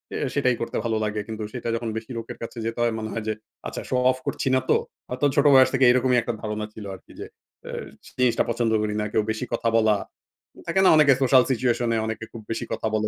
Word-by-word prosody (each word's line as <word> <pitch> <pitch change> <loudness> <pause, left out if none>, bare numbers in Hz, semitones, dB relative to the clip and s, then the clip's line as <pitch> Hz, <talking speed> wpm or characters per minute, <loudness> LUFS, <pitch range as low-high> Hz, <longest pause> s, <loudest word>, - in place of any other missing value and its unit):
এ - - -1 0.2
সেটাই 130 -3 +2
করতে 115 - -3
ভালো 115 -1 0
লাগে। 105 0 -2
কিন্তু 110 -1 -5
সেটা 120 -2 -4
যখন 115 -1 -3
বেশি 110 +2 -7
লোকের 115 - -6
কাছে 115 - -8
যেতে 115 +1 -3
হয় 115 - +1
মনে 110 0 -4
হয় 115 - -3
যে, 110 - +1 0.3
"আচ্ছা - - -5
শো 130 - 0 0.2
অফ 130 - -5
করছি - - -2
না - - +4
তো?" - - +5 0.3
হয়তো 125 +3 -1
ছোট 145 0 +3
বয়স 130 0 +7
থেকে 135 -1 +4
এরকমই 125 0 +3
একটা 120 - -3
ধারণা 105 -1 -3
ছিল 105 -2 -9
আরকি 90 - -17
যে - - -5 0.4
এ - - -5 0.5
জিনিসটা 125 -2 +3
পছন্দ 115 -1 0
করি 105 0 -1
না। - - -1
কেউ 110 - +2
বেশি 110 +3 -3
কথা 115 0 +1
বলা, 110 -2 +4 0.7
থাকে 190 - +1
না - - +7
অনেকে 145 -3 +6
সোশ্যাল 130 -1 +6
সিচুয়েশন 120 -1 +1
এ - - +1
অনেকে 110 0 -4
খুব 115 - -8
বেশি 115 - -3
কথা - - -2
বলে। 110 0 0
115 Hz, 240 wpm, -24 LUFS, 110-125 Hz, 0.7 s, বয়স